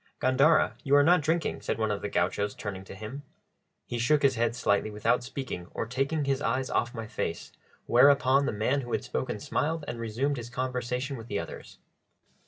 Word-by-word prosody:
"Gandara, 135 +5 +4
you 140 -1 +3
are 145 - +7
not 175 +3 +5
drinking," 165 +2 0
said - - -2
one 110 -1 0
of 105 - -2
the 105 - -3
gauchos, 100 +3 0
turning 95 -3 -6
to 95 - -10
him. 110 +8 -7 0.6
He 120 - -4
shook 145 +5 +3
his 135 -1 +5
head 115 -1 0
slightly 100 -3 +1
without 105 +4 +1
speaking 130 -9 -5
or - - -1
taking 135 +5 -1
his 135 0 0
eyes 130 +2 -1
off 120 +1 0
my 115 -1 -4
face; 110 - -4 0.3
whereupon 135 +2 +5
the - - +1
man 120 +7 0
who 120 -2 -6
had - - 0
spoken 60 +1 -3
smiled 160 0 -1
and 120 - -5
resumed 120 +6 -1
his 120 -1 -6
conversation 125 +1 -3
with 115 0 -9
the 100 - -2
others. - - -7
125 Hz, 195 wpm, -28 LUFS, 110-140 Hz, 0.6 s, are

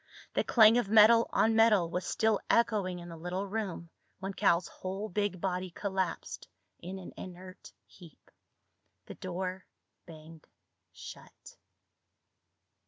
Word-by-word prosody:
The - - +1
clang 225 0 +6
of 205 - -3
metal 225 +2 +6
on 225 0 +2
metal 220 -6 +4
was 180 +2 -4
still 220 -2 +1
echoing 205 -6 +2
in 175 0 -9
the 170 - -9
little 180 +4 -4
room 200 -4 -4 0.3
when 195 +1 -5
Cal's 180 -3 +2
whole 195 +3 -6
big 205 -1 -2
body 185 0 -2
collapsed 190 -1 -4 0.3
in 185 +3 -7
an 185 - -10
inert 185 +1 -11
heap. 170 -5 -18 0.7
The - - -9
door 185 0 -5 0.4
banged 160 0 -13 0.4
shut. - - -12
190 Hz, 125 wpm, -30 LUFS, 180-210 Hz, 0.7 s, clang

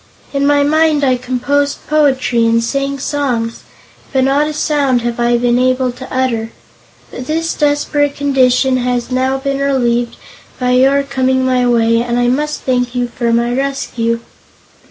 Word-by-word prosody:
In 280 0 +1
my 290 0 +3
mind 310 0 +2
I 260 -2 +3
composed 255 +3 -1
poetry 265 -6 +2
and 230 0 +2
sang 275 +3 -2
songs, 255 -5 -2 0.5
but 265 -1 +2
not 280 +3 +2
a 305 - -4
sound 280 -5 0
have 240 0 -3
I 240 0 +2
been 240 0 +1
able 255 0 +1
to 255 +2 -11
utter. 240 -4 -1 0.6
But 250 - -8
this 325 +1 -1
desperate 290 0 0
condition 265 -2 +2
has 245 0 -2
now 260 +1 0
been 275 0 -3
relieved 245 -4 0 0.4
by 250 -1 0
your 270 +3 +3
coming 260 -1 0
my 250 -1 +2
way 230 -1 +2
and 240 0 -2
I 245 0 +2
must 300 +4 -1
thank 250 -1 -1
you 245 -1 -1
for 235 -1 -2
my 235 +1 +1
rescue." 245 -4 -2
260 Hz, 160 wpm, -15 LUFS, 245-280 Hz, 0.6 s, my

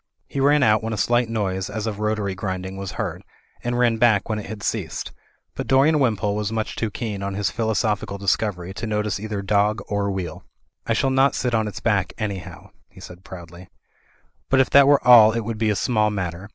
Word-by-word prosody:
He 140 - -5
ran 145 +1 +4
out 110 -3 +4
when 110 0 -3
a - - -3
slight 120 +2 +1
noise 95 -4 -2
as 110 +1 -4
of 105 -2 -4
rota 105 0 -1
tory 100 -1 -2
grinding 95 -1 -5
was 95 -1 -6
heard; - - -4 0.4
and 120 0 -1
ran 120 -2 +2
back 110 -4 +3
when 110 -1 -1
it 105 - -8
had 105 -3 -8
ceased. - - -3 0.4
But - - -5
Dorian 145 +4 +4
Wimpole 105 -6 +1
was 105 0 -2
much 110 -1 -3
too 110 - -2
keen 105 -2 -5
on 100 0 -3
his 105 0 -1
philosophical 110 -3 -1
discovery 95 -2 -1
to 115 - -5
notice 105 -1 -1
either 105 -1 -4
dog 105 +2 +1
or 100 -1 -1
wheel. 95 -3 -5 0.4
'1 - - +1
shall 135 - +1
not 135 +1 +3
sit 125 -1 -1
on 110 -1 +1
its 105 - -7
back, 105 -5 0
anyhow," 100 -5 -6 0.2
he - - -17
said 90 +1 -12
proudly, 85 -1 -11 0.8
"but 135 - +3
if 130 - +2
that 140 -1 +7
were 145 -1 +4
all 110 -3 +8
it 115 - -1
would 110 0 -5
be 110 -1 +1
a 105 - +1
small 110 0 +1
matter. 95 -1 -5
105 Hz, 220 wpm, -22 LUFS, 100-115 Hz, 0.8 s, all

